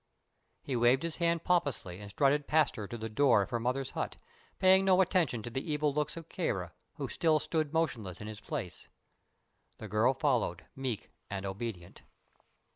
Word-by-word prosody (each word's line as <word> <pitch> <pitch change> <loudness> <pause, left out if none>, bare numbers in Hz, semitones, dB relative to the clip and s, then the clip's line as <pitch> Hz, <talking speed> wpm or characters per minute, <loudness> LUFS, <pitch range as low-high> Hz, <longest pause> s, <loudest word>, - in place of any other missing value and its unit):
He 135 - -2
waved 120 +4 +4
his 165 -1 -3
hand 170 -1 +1
pompously 140 - 0
and 105 -1 -9
strutted 140 +6 +2
past 155 0 +3
her 105 -2 -5
to 120 - -6
the 110 0 -4
door 115 -2 +4
of 95 - -9
her 120 - 0
mother's 125 +3 -1
hut, - - -3 0.4
paying 190 +1 +6
no 190 -1 +4
heed 170 - +2
to 120 - -5
the 135 +5 -3
evil 150 -1 +1
looks 150 +2 -1
of 165 -1 -8
Kāra, 95 - -2 0.2
who - - -4
still 160 -2 +2
stood 155 -1 -1
motionless 115 - -1
in 105 - -7
his 110 -1 -7
place. 90 -4 -5 0.9
The 110 - -7
girl 110 +6 +3
followed, 125 - 0
meek 130 -5 -4 0.2
and 100 0 -4
obedient. 95 -3 -6
130 Hz, 180 wpm, -32 LUFS, 105-155 Hz, 0.9 s, paying